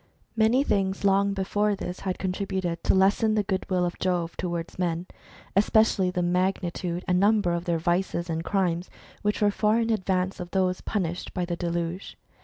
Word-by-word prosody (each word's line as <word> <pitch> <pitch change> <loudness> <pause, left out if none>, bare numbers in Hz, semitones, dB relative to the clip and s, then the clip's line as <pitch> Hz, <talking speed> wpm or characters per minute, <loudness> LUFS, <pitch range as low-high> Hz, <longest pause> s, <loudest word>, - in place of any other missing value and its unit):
Many 230 +4 +4
things 195 -7 0
long 200 0 +3
before 205 +2 0
this 180 -1 -6
had 185 -2 -3
contributed 190 -2 -2
to - - +4
lessen 205 +3 +3
the 210 - +2
goodwill 185 -2 0
of 175 - -4
Jove 175 -2 -1
towards 170 -1 -4
men, 170 -1 -1 0.5
especially 205 -2 +3
the 180 -1 -1
magni 180 0 0
tude 175 0 -4
and 180 0 +3
number 205 -3 +3
of 170 0 -2
their 170 -2 +1
vices 175 +1 0
and 165 -1 -2
crimes, 180 -2 0 0.3
which 210 0 0
were 205 - +4
far 215 +2 +2
in 230 0 +1
advance 185 -2 0
of 175 -1 -6
those 185 -1 0
punished 180 -4 -3
by 180 -2 0
the 175 0 -3
deluge. 170 +1 -3
185 Hz, 180 wpm, -26 LUFS, 175-200 Hz, 0.5 s, Many